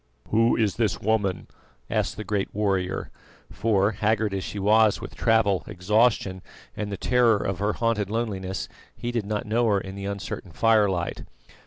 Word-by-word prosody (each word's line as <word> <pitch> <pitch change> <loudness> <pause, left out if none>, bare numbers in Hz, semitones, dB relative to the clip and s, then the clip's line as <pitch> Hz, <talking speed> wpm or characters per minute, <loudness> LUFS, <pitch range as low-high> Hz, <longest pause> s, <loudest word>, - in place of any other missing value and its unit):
"Who 115 +2 +4
is 110 -4 +1
this 110 -7 0
woman?" 100 -4 0 0.4
asked - - -1
the 110 - -4
great 105 -2 -1
warrior; 95 -3 -1 0.4
for, 100 -1 +2
haggard 110 0 0
as 95 -1 -2
she - - -6
was 105 +1 +4
with - - -8
travel, 110 -4 +2
exhaustion, 100 0 +1 0.3
and 105 -1 -4
the 100 - -3
terror 120 0 +3
of 95 -2 -3
her 105 +1 0
haunted 115 -4 0
loneliness, 100 -4 -3 0.3
he 120 - -4
did 115 -4 -2
not 105 -1 -2
know 115 +2 +1
her 100 -2 +3
in 95 0 -8
the 100 0 -6
uncertain 100 -3 -5
firelight. 100 0 +2
105 Hz, 165 wpm, -25 LUFS, 95-110 Hz, 0.4 s, Who